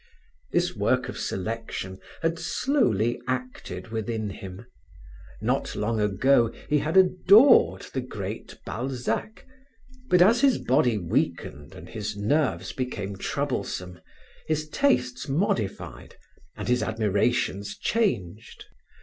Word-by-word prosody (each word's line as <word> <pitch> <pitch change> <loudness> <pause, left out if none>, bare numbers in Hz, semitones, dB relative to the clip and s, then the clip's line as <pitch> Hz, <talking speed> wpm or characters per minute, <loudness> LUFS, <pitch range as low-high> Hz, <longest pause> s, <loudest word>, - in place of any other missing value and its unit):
This - - +1
work - - +1
of - - -6
selection 95 -2 -4 0.2
had 165 +1 0
slowly 120 - +1
acted 125 -7 -4
within 110 -1 -3
him; 95 +3 -9 0.8
not - - 0
long 110 +1 -1
ago 115 +4 +3 0.2
he 150 0 +2
had 155 +5 0
adored 195 +7 +6
the 130 - -1
great 105 -4 -7
Balzac, 125 - -3 0.6
but 180 - +5
as 225 +7 +5
his 270 -4 +4
body 125 -3 +2
weakened 80 -5 -2
and - - -10
his 105 -2 -5
nerves 105 - 0
became 105 -6 -4
troublesome, 90 -1 -3 0.5
his 155 -1 -1
tastes 125 - +1
modified 135 - -2 0.4
and - - -5
his 125 0 +2
admirations 105 -1 0
changed. 115 - -2
120 Hz, 110 wpm, -26 LUFS, 100-150 Hz, 0.8 s, adored